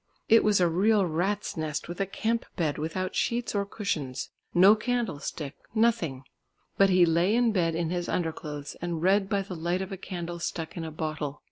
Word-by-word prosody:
It 225 0 +6
was 210 -2 +4
a 175 - +4
real 200 +4 +3
rats' 185 +5 -1
nest 155 -1 -3
with 175 +3 -5
a 195 - 0
camp 230 +4 -1
bed 155 -5 -1
without 185 +4 -2
sheets 235 -1 0
or 200 -1 0
cushions. 150 - -3 0.2
No 190 +4 +7
candlestick, 210 - -3 0.2
nothing. 220 - +1 0.5
But 195 0 +5
he 180 -1 +6
lay 170 +5 +3
in 240 -1 +3
bed 170 -5 +1
in 165 0 -1
his 175 -1 -2
under 165 -3 0
clothes 150 -2 -7
and 170 -2 -3
read 195 +1 +3
by 200 -1 +1
the 190 -1 -7
light 175 +3 -1
of 190 - -8
a 195 - -4
candle 175 -2 -5
stuck 165 -1 -4
in 170 - -4
a 160 - -4
bottle. 155 -2 -4
175 Hz, 200 wpm, -28 LUFS, 160-200 Hz, 0.5 s, No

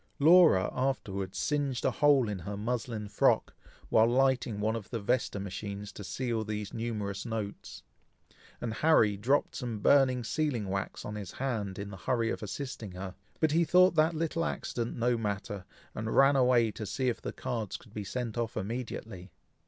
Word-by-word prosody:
Laura 155 - +6
afterwards 100 -8 -2
singed 140 -4 -1
a - - +3
hole 145 -5 +4
in 105 -2 -3
her 100 +4 -5
muslin 115 -1 -3
frock, - - +2 0.4
while 110 +1 +5
lighting 125 -3 +2
one 110 +2 0
of 110 -4 -6
the 115 - -3
Vesta 110 -1 0
matches 100 +1 -5
to 105 - -9
seal 115 +2 -2
these 105 -1 -4
numerous 105 -4 -3
notes; 110 -4 -5 0.8
and 115 -2 -3
Harry 115 -7 +4
dropped 130 +9 +1
some 120 -4 -3
burning 130 +2 +4
sealing 125 -5 -1
wax 95 0 -3
on 105 - -5
his 105 -4 -6
hand, 110 -8 -3
in 100 0 -6
the 95 - -8
hurry 115 +4 0
of - - -4
assisting 110 -2 -5
her; 95 0 -6 0.3
but 160 -2 +2
he 165 +2 +4
thought 180 +2 +5
that 160 +1 +3
little 165 +1 -1
accident 120 -7 -3
no 120 0 +1
matter, 100 -2 -3 0.3
and 110 +1 -3
ran 135 +1 +6
away 125 -4 +4
to 110 0 -6
see 130 +6 -1
if 120 - -1
the - - -4
cards 115 -6 -4
could 110 - -19
be 105 - -4
sent 120 +2 -4
off 115 -1 -2
immediately. 110 -3 -5
115 Hz, 175 wpm, -30 LUFS, 105-130 Hz, 0.8 s, Laura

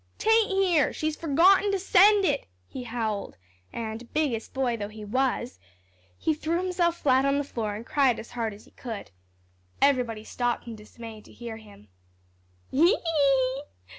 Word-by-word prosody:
"'Tain't 445 0 +3
here; 375 -6 +2
she's 310 0 -2
forgotten 355 +7 +4
to 395 - +1
send 395 +2 +5
it," 285 -4 0 0.2
he 260 - -7
howled, 220 - -3 0.3
and, 225 +1 -6
"biggest 270 -8 -1
boy" 260 -3 0
though 205 -3 -4
he 215 0 -9
was, 250 +2 -1 0.6
he 315 - 0
threw 320 +2 -1
himself 350 -2 0
flat 265 -4 +3
on 275 0 +2
the 285 - 0
floor 220 -6 -4
and 220 +3 -8
cried 270 -5 +2
as 220 - -9
hard 230 -2 -2
as 205 +1 -13
he - - -21
could. 225 - -7 0.7
Everybody 245 -6 +2
stopped 245 +2 -2
in 230 -2 -7
dismay 220 +1 -11
to - - -18
hear 235 -2 -8
him. 205 - -16 0.8
"Hee 305 +6 +5
hee - - +5
hee!" 275 - +1
260 Hz, 165 wpm, -27 LUFS, 225-325 Hz, 0.8 s, send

